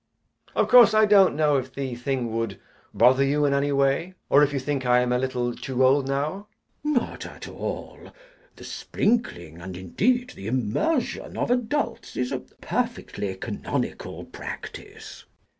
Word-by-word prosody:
Of - - +2
course 235 -1 +7
I 215 0 +6
don't 200 -6 +5
know 150 -2 +3
if 130 0 -5
the 135 -2 -3
thing 120 -2 -2
would 115 -4 -2 0.3
bother 125 +6 +5
you 145 +2 +2
in 140 - +2
any 140 +1 +1
way, 140 +6 +1 0.2
or 140 - +7
if 145 -1 +4
you 145 - -2
think 135 0 -2
I 125 0 +4
am 125 0 0
a 125 - +2
little 125 -2 -1
too 130 -1 0
old 135 +1 +3
now. 150 +9 -2 0.4
CHASUBLE. 300 - 0
Not - - -8
at - - -10
all. - - -6 0.4
The - - -13
sprinkling, 85 - -2
and, 90 +1 -7
indeed, 245 - 0
the 95 - -9
immersion 130 - -1
of - - 0
adults 245 -1 -1
is 125 0 -1
a - - -1
perfectly 95 -2 -4
canonical 95 - -4
practice. - - -9
135 Hz, 160 wpm, -25 LUFS, 125-195 Hz, 0.4 s, course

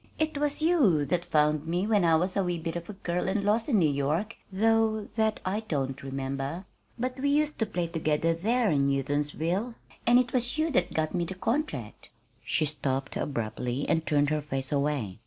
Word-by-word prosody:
"It 315 -1 0
was 295 +1 +1
you 245 - +4
that 175 +4 -1
found 150 0 +2
me 175 +4 0
when 210 -3 +3
I 165 -1 +5
was 180 +4 0
a 195 - +2
wee 175 -1 -1
bit 165 0 -4
of 170 0 -6
a - - -5
girl 180 -2 -2
and 200 +1 0
lost 220 +5 +1
in 230 - +3
New 170 -5 +4
York, 150 +11 -1 0.2
though 220 +1 +2
that 220 -1 +1
I 190 +3 0
don't 135 -6 -2
remember. 135 +5 -4 0.3
But 255 +2 -3
we 285 +2 +1
used 300 +1 +1
to 225 - +1
play 180 -4 -2
together 165 0 0
there 220 +6 +1
in 140 -2 +2
Houghtonsville, 150 - -1 0.3
and 240 +1 +7
it 250 -1 +1
was 245 +2 +1
you 315 +1 +1
that 180 -9 +1
got 155 -1 0
me 175 -2 0
the 190 +3 -6
contract 185 - -3 0.2
" - - -37
She 155 - +1
stopped 135 -2 -2
abruptly 125 +1 -2
and 160 - +1
turned 145 -2 +2
her 155 0 0
face 135 -2 -4
away. 140 -9 -1
170 Hz, 205 wpm, -28 LUFS, 145-220 Hz, 0.3 s, and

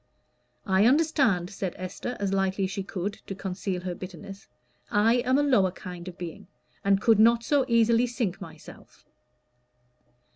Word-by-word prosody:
"I 190 +3 +4
understand," 260 - +2
said 190 -3 -4
Esther, 185 +7 -5
as 200 -1 -1
lightly 195 0 0
as 190 - -1
she 195 - -3
could, 195 +1 -5
to 195 - -5
conceal 190 -1 -4
her 180 -1 -4
bitterness. 195 +2 -10 0.4
"I 225 +4 +3
am 255 +2 +2
a 290 - +3
lower 245 -10 +3
kind 180 -1 -9
of 180 - -8
being, 175 -1 -8 0.4
and 195 0 +3
could 220 0 +4
not 230 +1 +5
so 280 +1 +2
easily 230 0 +3
sink 230 -6 -3
myself." - - -13
200 Hz, 155 wpm, -27 LUFS, 185-235 Hz, 0.4 s, not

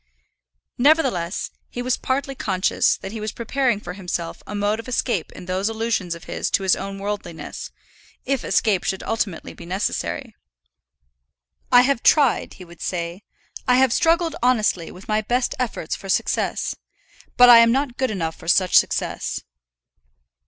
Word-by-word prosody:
Nevertheless, 250 - +2 0.2
he 245 - -5
was 255 0 +1
partly 275 +1 -2
conscious 190 -7 +1
that 195 - -8
he 220 - -6
was 215 0 -3
preparing 240 -1 0
for 180 -3 -7
himself 180 -3 -5
a 210 - -5
mode 205 +2 0
of 230 - -8
escape 235 -7 -1
in - - -10
those 185 +3 -1
allusions 220 -6 -1
of 170 - -12
his - - -3
to 195 - +1
his 190 - +4
own 195 0 -6
worldliness; 195 -4 -5 0.6
if 270 -1 -1
escape 205 -5 +1
should 190 - -2
ultimately 215 -6 -3
be - - -12
necessary. 185 +4 -3 1.4
"I 245 -1 +8
have 260 -2 +1
tried," 285 -6 +3
he 185 - -11
would 170 -1 -15
then - - -7
say; 175 +2 -4 0.4
"I 250 - +5
have 260 -2 +4
struggled 330 -1 +2
honestly, 215 -8 +2
with 185 - -13
my 215 0 +1
best 240 +3 0
efforts 230 -9 -2
for 195 - -10
success; - - 0 0.6
but 245 - +9
I 240 -1 +10
am 230 0 +6
not 265 -1 -1
good 260 - 0
enough 165 -6 -3
for - - -14
such 185 +1 +3
success." - - -2
215 Hz, 165 wpm, -22 LUFS, 185-250 Hz, 1.4 s, I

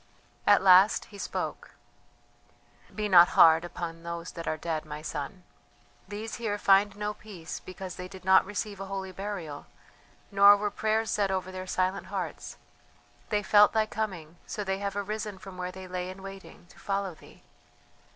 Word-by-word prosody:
At 205 -2 +6
last 190 +2 +6
he 200 - -10
spoke: - - -5 1.2
"Be 210 -1 -1
not 175 -3 +8
hard 160 0 +7
upon 170 -1 -6
those 170 0 -6
that 165 -1 -8
are 155 - -1
dead, 160 -1 -3
my 150 0 -8
son; 160 +4 -5 0.6
these 215 +2 -6
here 210 -3 -1
find 200 0 +4
no 210 0 -3
peace 190 -7 -9
because 185 -1 -8
they 180 - -6
did 185 -1 -12
not 190 0 +6
receive 205 0 -5
a 195 - -6
holy 190 -1 -5
burial, 185 -6 -6 0.6
nor 200 +1 +8
were 205 0 -2
prayers 220 +1 0
said 200 -2 +1
over 185 -1 -2
their 185 0 -7
silent 185 +1 -1
hearts; - - -5 0.7
they 210 -1 0
felt 205 +1 +6
thy 220 -1 +3
coming, 180 -7 -5
so 210 - -4
they 190 0 -2
have 200 -1 -3
arisen 210 0 -4
from 190 -1 -11
where 180 0 -4
they 185 0 -9
lay 180 0 -4
in 190 +1 -10
waiting, 195 -2 -11
to - - -18
follow 195 -2 -2
thee. - - -18
190 Hz, 170 wpm, -28 LUFS, 180-205 Hz, 1.2 s, not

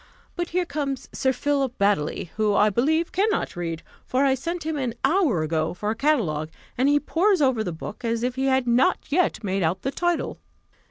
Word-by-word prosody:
But 345 -1 -3
here 360 +1 0
comes 280 -4 -3
Sir 265 - +1
Philip 275 -2 -1
Baddely, 195 -4 0
who, 215 -1 +1
I 210 +1 +4
believe, 315 - +1
cannot 425 - 0
read, 165 -2 -4 0.2
for 265 +2 +1
I 270 - +4
sent 335 +5 -4
him 320 0 -1
an 255 -5 -2
hour 310 - +2
ago 160 +1 -1
for 210 +3 -2
a - - -2
catalogue, 210 - 0 0.3
and 260 +3 +2
he 290 0 +4
pores 365 +6 +2
over 260 -6 +2
the 180 - -3
book 165 +8 -8
as 230 0 -1
if 250 0 0
he 265 +1 -2
had 265 -2 +2
not 240 +3 +4
yet 325 -8 +1
made 195 -1 -1
out 175 +3 0
the 270 - -1
title." 350 +2 -1
260 Hz, 205 wpm, -24 LUFS, 205-300 Hz, 0.3 s, I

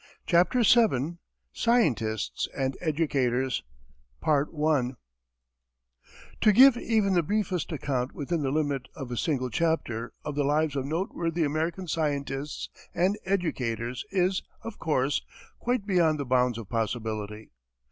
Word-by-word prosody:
CHAPTER 180 +7 +3
VII 175 - +3 0.3
SCIENTISTS 125 - +1
AND 135 -1 0
EDUCATORS 135 -6 0 2.8
To 215 - +6
give 260 +4 +8
even 220 -4 +1
the 175 - +4
briefest 190 -1 -1
account, 135 -4 -2
within 160 +3 -2
the 135 - 0
limits 140 -3 -1
of 130 -2 -7
a - - -2
single 130 -2 -1
chapter, 120 -7 -1
of 150 - -3
the 145 0 0
lives 150 +1 +1
of 135 -1 -1
noteworthy 165 0 -1
American 160 +5 -1
scientists 145 -3 -2 0.3
and 185 +4 +2
educators 125 - -1
is, 185 0 +1 0.2
of 225 - -7
course, 145 -3 +1 0.4
quite 245 -4 -1
beyond 170 -6 +2
the 140 - -2
bounds 125 -2 +2
of 115 -4 -7
possibility. 110 -2 -3
150 Hz, 120 wpm, -27 LUFS, 130-180 Hz, 2.8 s, give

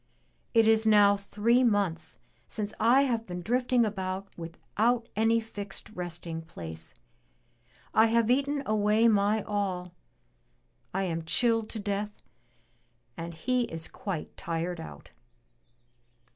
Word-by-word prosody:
It 225 -1 +6
is 220 0 +5
now 205 -2 +6
three 210 +5 +2
months 195 -8 0 0.3
since 210 0 -4
I 245 +5 +5
have 230 -4 -1
been 180 -1 -5
drifting 245 +2 +2
about 190 -1 -3
without 220 +8 -1
any 225 +2 +3
fixed 205 -4 -8
resting 175 -3 -5
place. 80 - -9 1.0
I 220 +1 +6
have 230 +1 +3
eaten 280 +2 +1
away 215 +1 +3
my 210 0 +3
all. 185 -4 -2 1.0
I 195 +1 -1
am 165 -3 -2
chilled 225 +7 +2
to 225 - -5
death 205 0 -3 0.9
and 170 0 -6
he 250 +9 0
is 165 -5 -5
quite 185 -6 -5
tired 170 +1 -3
out.'' 160 - -10
205 Hz, 120 wpm, -29 LUFS, 180-225 Hz, 1.0 s, It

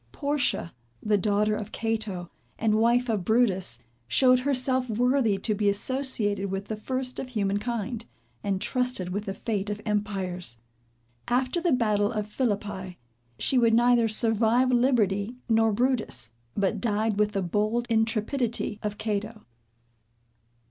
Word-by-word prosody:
Portia, 280 - -1 0.3
the 210 -1 +2
daughter 210 +1 +1
of 210 0 -6
Cato, 215 -6 -3 0.3
and 220 -1 +1
wife 240 +2 +3
of 215 -5 0
Brutus, 190 - +2 0.3
showed 255 -1 +4
herself 255 -1 0
worthy 240 -1 +2
to 215 +3 0
be 205 0 +2
associated 205 -3 0
with 195 +1 -4
the 220 - -2
first 255 +3 -3
of 255 - -5
human 205 -4 0
kind, 235 0 -4 0.4
and 195 -2 0
trusted 250 -6 0
with 205 +3 -3
the 195 - -3
fate 205 -2 -2
of 205 0 -3
empires. 190 - -2 0.7
After 255 +7 +1
the 345 -1 +1
battle 215 -4 +2
of 215 -3 -2
Phillippi, 205 -5 -3 0.4
she 260 - +2
would 230 -2 +4
neither 240 -1 +4
survive 225 +3 +2
liberty 235 -4 +2
nor 225 -1 +3
Brutus, 235 - 0 0.3
but 195 -2 0
died 215 -2 0
with 210 0 +2
the 195 -2 0
bold 215 +6 0
intrepidity 225 0 0
of 210 -1 -3
Cato. 215 0 -3
220 Hz, 140 wpm, -27 LUFS, 205-245 Hz, 0.7 s, showed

